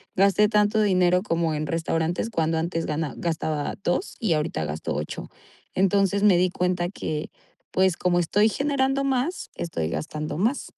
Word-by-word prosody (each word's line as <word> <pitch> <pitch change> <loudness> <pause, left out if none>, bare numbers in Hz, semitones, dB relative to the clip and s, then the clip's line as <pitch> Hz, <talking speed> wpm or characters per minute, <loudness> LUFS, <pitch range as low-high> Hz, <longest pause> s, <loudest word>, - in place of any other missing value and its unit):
gasté 200 +2 +4
tanto 210 0 +3
dinero 180 -3 +3
como 165 -5 0
en 155 +1 -3
restaurantes 165 +5 -1
cuando 165 -4 0
antes 165 0 -2
gana 155 -1 -2
gastaba 155 -3 -2
2 175 - -1
y 215 -7 +1
ahorita 150 - -1
gasto 75 +1 -4
8". - - -5 0.5
Entonces, 195 +1 +2
me 195 -4 +6
di 180 +1 +3
cuenta 180 -1 0
que, 155 -5 -4 0.4
pues, 185 -2 +3
como 175 -1 +2
estoy 205 +6 +3
generando 275 +1 0
más, 270 +6 -1
estoy 120 - -3
gastando 150 - -4
más. 235 +9 0
180 Hz, 155 wpm, -25 LUFS, 160-205 Hz, 0.5 s, me